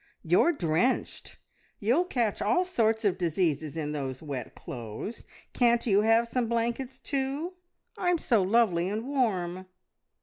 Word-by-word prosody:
"You're 175 Hz, -, +4 dB
drenched! 180 Hz, -, -1 dB, 0.4 s
You'll 250 Hz, -, +2 dB
catch 235 Hz, -, -1 dB
all 360 Hz, -, +2 dB
sorts 225 Hz, -10 st, +1 dB
of 190 Hz, -2 st, +1 dB
diseases 160 Hz, -3 st, 0 dB
in 150 Hz, -2 st, -2 dB
those 135 Hz, -3 st, -4 dB
wet 135 Hz, -6 st, -6 dB
clothes. 120 Hz, -, -7 dB, 0.3 s
Can't 235 Hz, -1 st, +3 dB
you 205 Hz, -3 st, +4 dB
have 225 Hz, +2 st, +3 dB
some 240 Hz, 0 st, -1 dB
blankets 235 Hz, +3 st, -2 dB
too? 280 Hz, +6 st, -3 dB, 0.5 s
I'm 355 Hz, -1 st, +2 dB
so 235 Hz, -9 st, +2 dB
lovely 185 Hz, -3 st, +2 dB
and 220 Hz, +4 st, -3 dB
warm." 185 Hz, -9 st, -1 dB
220 Hz, 135 wpm, -28 LUFS, 175-250 Hz, 0.5 s, You're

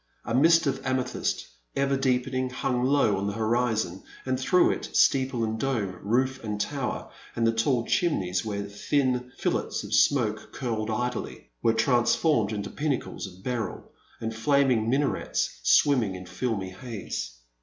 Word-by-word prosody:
A 115 Hz, -, -2 dB
mist 165 Hz, +6 st, +5 dB
of 135 Hz, -1 st, -1 dB
amethyst, 130 Hz, -1 st, -1 dB, 0.3 s
ever 140 Hz, 0 st, +1 dB
deepening, 130 Hz, -1 st, 0 dB
hung 125 Hz, -1 st, -1 dB
low 135 Hz, -6 st, +3 dB
on 100 Hz, +1 st, -2 dB
the 100 Hz, -, -2 dB
horizon, 110 Hz, -4 st, 0 dB, 0.2 s
and 130 Hz, -1 st, 0 dB
through 180 Hz, +7 st, +4 dB
it, -, -, -4 dB
steeple 130 Hz, -3 st, +3 dB
and 110 Hz, 0 st, -2 dB
dome, 110 Hz, -8 st, -1 dB
roof 130 Hz, +5 st, 0 dB
and 105 Hz, -2 st, -3 dB
tower, 135 Hz, +3 st, -3 dB, 0.2 s
and 115 Hz, -, +1 dB
the 115 Hz, -, +4 dB
tall 115 Hz, +1 st, +1 dB
chimneys 95 Hz, -, +1 dB
where 100 Hz, -2 st, -3 dB
thin 125 Hz, +4 st, -1 dB
fillets -, -, -1 dB
of -, -, -6 dB
smoke 110 Hz, -6 st, +2 dB
curled 115 Hz, -4 st, -2 dB
idly, 120 Hz, +2 st, -3 dB
were 115 Hz, -, +3 dB
transformed 120 Hz, 0 st, +2 dB
into 105 Hz, -2 st, -4 dB
pinnacles 140 Hz, -7 st, -2 dB
of 95 Hz, 0 st, -14 dB
beryl 120 Hz, -6 st, -4 dB, 0.3 s
and 115 Hz, 0 st, -4 dB
flaming 125 Hz, -2 st, +2 dB
minarets, 140 Hz, +3 st, 0 dB
swimming 120 Hz, -10 st, +4 dB
in 90 Hz, 0 st, -8 dB
filmy 95 Hz, 0 st, -3 dB
haze. 95 Hz, -, -6 dB
120 Hz, 150 wpm, -27 LUFS, 110-130 Hz, 0.3 s, mist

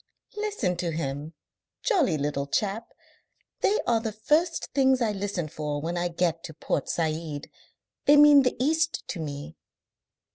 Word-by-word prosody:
"Listen 415 Hz, -, -1 dB
to 175 Hz, -1 st, -2 dB
him. 150 Hz, 0 st, -4 dB, 0.5 s
Jolly 340 Hz, -, +2 dB
little 140 Hz, -1 st, -2 dB
chap! 210 Hz, +7 st, -1 dB, 0.7 s
They 420 Hz, -, +2 dB
are 235 Hz, -1 st, +3 dB
the 225 Hz, -1 st, -3 dB
first 300 Hz, -, 0 dB
things 265 Hz, -1 st, +4 dB
I 230 Hz, -3 st, +1 dB
listen 195 Hz, -4 st, -3 dB
for 150 Hz, -1 st, -4 dB
when 165 Hz, +4 st, -3 dB
I 175 Hz, 0 st, 0 dB
get 170 Hz, -1 st, -1 dB
to 160 Hz, -, -9 dB
Port 145 Hz, -, -2 dB
Said. 155 Hz, -2 st, -3 dB, 0.5 s
They 290 Hz, +1 st, +7 dB
mean 295 Hz, -1 st, +8 dB
the 250 Hz, -, +1 dB
East 315 Hz, +4 st, 0 dB
to 175 Hz, -, -4 dB
me." 150 Hz, 0 st, -6 dB
180 Hz, 150 wpm, -26 LUFS, -, 0.7 s, mean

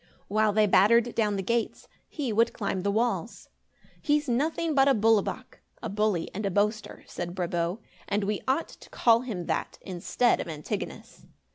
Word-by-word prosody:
While 215 Hz, +1 st, +2 dB
they 215 Hz, +1 st, +3 dB
battered 230 Hz, +5 st, +4 dB
down 210 Hz, -3 st, +1 dB
the 195 Hz, -, -2 dB
gates, 235 Hz, +3 st, -2 dB, 0.2 s
he 275 Hz, -8 st, -3 dB
would 230 Hz, +2 st, +3 dB
climb 195 Hz, -3 st, -2 dB
the 200 Hz, -, 0 dB
walls. 230 Hz, +4 st, -1 dB, 0.5 s
"He's 295 Hz, 0 st, +1 dB
nothing 310 Hz, +6 st, 0 dB
but 270 Hz, -1 st, +4 dB
a 275 Hz, -, +5 dB
'bulle 220 Hz, 0 st, +4 dB
wak'" -, -, -7 dB, 0.2 s
(a 225 Hz, -, -3 dB
bully 210 Hz, -4 st, 0 dB
and 210 Hz, -, -4 dB
a 200 Hz, -, 0 dB
boaster), 210 Hz, +3 st, -1 dB
said 175 Hz, 0 st, -6 dB
Brabo, 175 Hz, 0 st, -1 dB, 0.3 s
"and 205 Hz, +1 st, 0 dB
we 205 Hz, +1 st, -2 dB
ought 270 Hz, +6 st, 0 dB
to -, -, -15 dB
call 230 Hz, -1 st, +4 dB
him 210 Hz, -9 st, -5 dB
that, -, -, -2 dB
instead 190 Hz, +6 st, 0 dB
of -, -, -6 dB
Antigonus." 155 Hz, -2 st, -6 dB
215 Hz, 175 wpm, -27 LUFS, 195-235 Hz, 0.5 s, a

